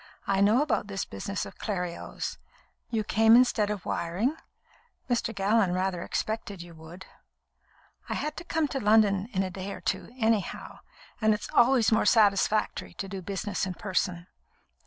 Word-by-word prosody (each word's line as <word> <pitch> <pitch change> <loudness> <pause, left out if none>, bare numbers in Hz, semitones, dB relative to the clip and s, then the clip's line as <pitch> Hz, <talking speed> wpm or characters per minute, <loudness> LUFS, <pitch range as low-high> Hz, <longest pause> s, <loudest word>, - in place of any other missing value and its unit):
"I 195 0 +1
know 215 +7 +5
about 300 -8 -1
this 195 -1 -3
business 185 - -4
of - - -12
Clerios. 180 -5 -4 0.5
You 220 -2 0
came 225 +2 +5
instead 240 -4 +4
of 210 -4 -4
wiring? 195 - -1 0.7
Mr. 240 -2 0
Gallon 200 -2 +2
rather 185 -1 -1
expected 215 -2 -3
you 170 0 -10
would." 160 +3 -12 1.0
"I - - -1
had 300 0 -3
to - - -6
come 320 -3 0
to 270 - -2
London 210 -3 +3
in 195 -3 0
a 185 - -4
day 190 +2 -6
or - - -7
two, - - -2
anyhow, 220 -4 -1 0.4
and 215 -1 +4
it's 210 - -7
always 240 -3 +4
more 220 - +3
satisfactory 210 -1 +2
to 195 - -5
do 190 0 -6
business 195 +1 -3
in 185 - -5
person." 180 -3 -2
205 Hz, 160 wpm, -28 LUFS, 190-225 Hz, 1.0 s, know